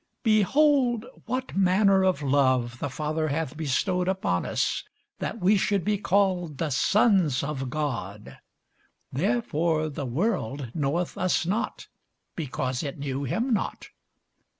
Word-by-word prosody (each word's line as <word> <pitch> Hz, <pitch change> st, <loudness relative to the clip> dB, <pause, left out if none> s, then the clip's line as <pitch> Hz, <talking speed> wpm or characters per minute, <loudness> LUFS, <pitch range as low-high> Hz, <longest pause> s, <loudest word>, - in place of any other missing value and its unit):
Behold, 240 Hz, +2 st, +3 dB, 0.2 s
what 255 Hz, +2 st, -3 dB
manner 195 Hz, +1 st, +4 dB
of 185 Hz, -6 st, +1 dB
love 130 Hz, -4 st, +2 dB
the 145 Hz, -, -2 dB
Father 155 Hz, +3 st, -2 dB
hath 155 Hz, 0 st, -2 dB
bestowed 180 Hz, +5 st, 0 dB
upon 185 Hz, -, 0 dB
us, -, -, 0 dB, 0.4 s
that -, -, -4 dB
we 195 Hz, +4 st, +4 dB
should 195 Hz, -2 st, +1 dB
be 210 Hz, -2 st, +1 dB
called 185 Hz, -6 st, +1 dB
the 160 Hz, -1 st, -2 dB
sons 185 Hz, -, +3 dB
of 135 Hz, -3 st, -3 dB
God: 120 Hz, -9 st, -4 dB, 0.7 s
therefore 165 Hz, -, 0 dB
the 145 Hz, -2 st, -5 dB
world 140 Hz, -, -2 dB
knoweth 160 Hz, +3 st, -1 dB
us 185 Hz, -2 st, +1 dB
not, 205 Hz, +6 st, -2 dB, 0.5 s
because 130 Hz, -5 st, -2 dB
it 140 Hz, -3 st, -5 dB
knew 140 Hz, -1 st, -3 dB
him 235 Hz, -, 0 dB
not. 210 Hz, -, -3 dB
165 Hz, 125 wpm, -26 LUFS, 140-195 Hz, 0.7 s, manner